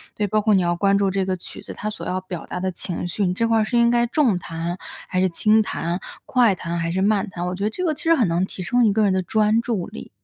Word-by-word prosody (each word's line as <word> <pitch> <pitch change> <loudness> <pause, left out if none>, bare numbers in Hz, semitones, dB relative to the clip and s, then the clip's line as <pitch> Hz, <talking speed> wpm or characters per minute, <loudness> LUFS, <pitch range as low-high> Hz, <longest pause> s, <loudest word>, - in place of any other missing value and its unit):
对， 210 - 0
包 215 +2 +1
括 215 0 +3
你 190 - +4
要 175 0 +1
关 200 +2 +3
注 200 -1 +2
这 195 0 0
个 185 -1 -1
曲 - - -9
子 - - -8
它 215 - -4
所 215 - -7
要 185 - -1
表 185 -2 -7
达 - - -5
的 190 +1 -1
情 175 0 -3
绪， 195 +3 -1
你 180 - +1
这 230 +5 0
块 225 -1 +3
儿 - - +3
是 240 +3 0
应 235 0 +5
该 240 0 +3
重 245 - +2
弹 170 +1 -4 0.3
还 185 - 0
是 185 - +3
轻 215 +5 +3
弹， 175 -2 -3 0.2
快 245 -5 +4
弹 170 -1 -4
还 165 0 -1
是 190 +2 -1
慢 205 0 +2
弹， 175 -2 -5
我 180 - -3
觉 195 - -4
得 210 - +2
这 365 +11 -4
个 320 - +1
其 305 - -8
实 330 - +4
很 245 - +2
能 170 +2 +1
提 190 0 -5
升 240 +7 +2
一 215 - +4
个 215 +1 +2
人 195 - +2
的 185 - +1
专 215 +4 +2
注 220 -7 -2
力。 70 - -10
195 Hz, 330 characters per minute, -22 LUFS, 180-220 Hz, 0.3 s, 应